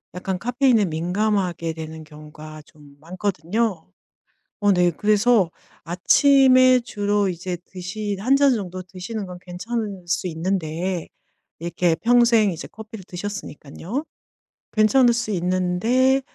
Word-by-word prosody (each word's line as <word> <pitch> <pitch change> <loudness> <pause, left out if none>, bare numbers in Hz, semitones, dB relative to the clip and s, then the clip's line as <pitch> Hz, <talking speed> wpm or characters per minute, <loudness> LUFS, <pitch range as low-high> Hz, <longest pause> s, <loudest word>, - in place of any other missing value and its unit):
약간 185 0 -3
카페인에 245 -2 +2
민감하게 180 0 -1
되는 160 0 -8
경우가 155 0 -12
좀 145 -2 -19
많거든요. 185 +3 -2 0.8
어 205 -1 +4
네 175 -1 +3
그래서 210 0 +2 0.4
아침에 255 - +5
주로 205 -3 0
이제 175 0 -4
드시 200 +2 -5
1 255 +6 +3
잔 280 -2 +4
정도 185 -4 -4
드시는 190 +4 -6
건 180 -1 -9
괜찮을 200 +1 -5
수 175 +2 -1
있는데 175 0 -2 0.5
이렇게 170 0 0
평생 235 0 +4
이제 165 - -7
커피를 220 -1 -10
드셨으니깐요. 190 - -6 0.7
괜찮을 235 +3 +4
수 235 -2 -2
있는데 185 +9 +1
190 Hz, 260 characters per minute, -22 LUFS, 175-225 Hz, 0.8 s, 아침에